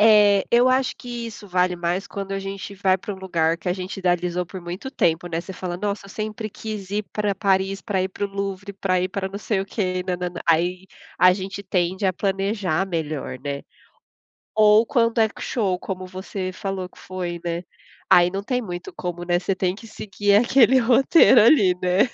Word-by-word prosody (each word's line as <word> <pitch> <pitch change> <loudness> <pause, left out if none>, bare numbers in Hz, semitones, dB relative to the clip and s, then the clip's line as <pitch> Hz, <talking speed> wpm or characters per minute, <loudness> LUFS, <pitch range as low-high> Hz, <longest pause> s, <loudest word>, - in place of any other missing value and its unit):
É, 210 -2 +6
eu 245 +2 +5
acho 260 0 +2
que 240 -1 -6
isso 215 -2 -9
vale 180 -1 +1
mais 175 +3 -2
quando 195 -1 -5
a 195 - -1
gente 195 +1 -6
vai 190 -1 +2
pra 205 +1 -6
um 190 - -12
lugar 165 -3 0
que 180 - -5
a - - +2
gente 185 +2 -6
idealizou 180 -1 0
por 185 +2 -9
muito 175 +10 -6
tempo, 165 -7 +1
né? 165 -1 -2
Você 190 - -9
fala 180 -1 -5
nossa, 200 +1 -3
eu - - -13
sempre 215 +1 -5
quis 210 -2 -7
ir 210 +1 -1
pra 210 -1 0
Paris, 195 -1 +1
pra 190 -3 -1
ir 190 - -1
para 205 +2 -4
o - - -2
Louvre, 200 0 -4
pra 185 -2 0
ir 185 - 0
pra 190 0 -3
não 200 - -6
sei 210 -2 -1
o - - -2
quê 185 -2 -2
nã-nã-nã, 180 -1 -3
aí 180 +3 +2 0.3
a 185 0 +7
gente 195 +1 -5
tende 185 +1 -1
a 185 - +2
planejar 195 -2 -1
melhor, 155 -6 -3
né. 140 0 -4 0.9
Ou 215 +1 +6
quando 230 -2 +1
é 220 -1 +5
que - - -15
o - - -4
show, 195 -7 0
como 185 -1 -5
você 185 0 -5
falou 190 -1 -4
que - - -21
foi, 180 -2 -5
né. 170 0 -2 0.5
Aí 175 0 +6
não 195 +1 -3
tem 250 +3 -1
muito 175 -3 -6
como, 175 -1 -4
né. 175 0 +2
Você 185 +2 -1
tem 185 0 0
que 225 +2 -12
seguir 205 -1 -1
aquele 250 +2 +5
roteiro 250 0 +6
ali, 205 -7 +5
né? 180 +6 +3
190 Hz, 210 wpm, -23 LUFS, 180-210 Hz, 0.9 s, a